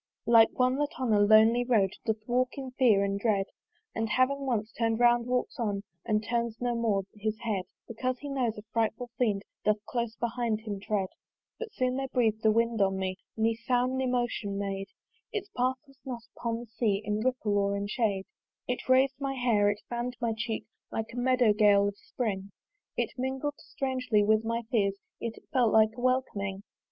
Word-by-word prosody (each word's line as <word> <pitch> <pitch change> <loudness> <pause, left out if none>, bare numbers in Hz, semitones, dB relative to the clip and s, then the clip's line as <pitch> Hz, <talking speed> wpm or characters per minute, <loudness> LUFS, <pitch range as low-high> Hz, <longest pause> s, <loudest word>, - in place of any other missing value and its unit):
Like 230 -1 +7
one, 255 +1 +3
that 290 -1 -2
on 250 -4 +1
a 205 - +4
lonely 220 +3 +6
road 220 -6 +3 0.2
Doth 220 -1 -1
walk 255 +2 +1
in 265 -2 -5
fear 235 -6 +4
and 200 0 -1
dread, 200 -3 +1 0.5
And 225 0 -2
having 270 +4 +1
once 220 -3 -1
turn'd 225 0 0
round, 240 0 +4
walks 250 +1 -1
on 205 -4 -1 0.2
And 215 -1 +1
turns 235 0 -1
no 245 0 0
more 220 -4 +1
his 215 0 -3
head: 205 -5 -1 0.2
Because 255 +3 -2
he 290 - -8
knows, 255 -6 -1
a 210 - -8
frightful 230 +1 -1
fiend 210 -5 +1 0.2
Doth 210 0 +1
close 235 -2 -2
behind 235 -2 -1
him 210 -3 -5
tread. 195 -2 -1 0.5
But 465 -2 -5
soon 255 0 0
there 270 0 -2
breath'd 225 -4 +1
a 220 - +5
wind 230 0 +1
on 195 -1 +2
me, 185 -1 -2 0.2
Ne 225 +1 +2
sound 245 +2 0
ne 260 - 0
motion 240 -5 -1
made: 195 -1 -3 0.4
Its 410 -2 -4
path 255 +1 +1
was 275 -1 -21
not 245 -3 -6
upon 230 0 -2
the - - -8
sea 220 -3 0
In 210 +1 0
ripple 230 -3 0
or 200 0 +1
in 200 - -2
shade. 205 -3 0 0.4
It 250 +1 -3
rais'd 260 +1 +5
my 275 -1 -1
hair, 230 -5 +3
it 205 0 -2
fann'd 240 +1 -3
my 235 -2 0
cheek, 220 -1 -3 0.3
Like 225 0 -4
a - - -8
meadow 245 -3 +4
gale 205 -1 +5
of 200 - -3
spring 200 -5 -3 0.5
It - - -1
mingled 265 +3 -2
strangely 255 -5 0
with 215 +1 +3
my 230 +1 -1
fears, 200 -5 +2 0.2
Yet 230 -1 -4
it - - -14
felt 245 -5 +4
like 220 0 +4
a 245 - -7
welcoming. 205 -7 0
230 Hz, 195 wpm, -29 LUFS, 210-250 Hz, 0.5 s, Like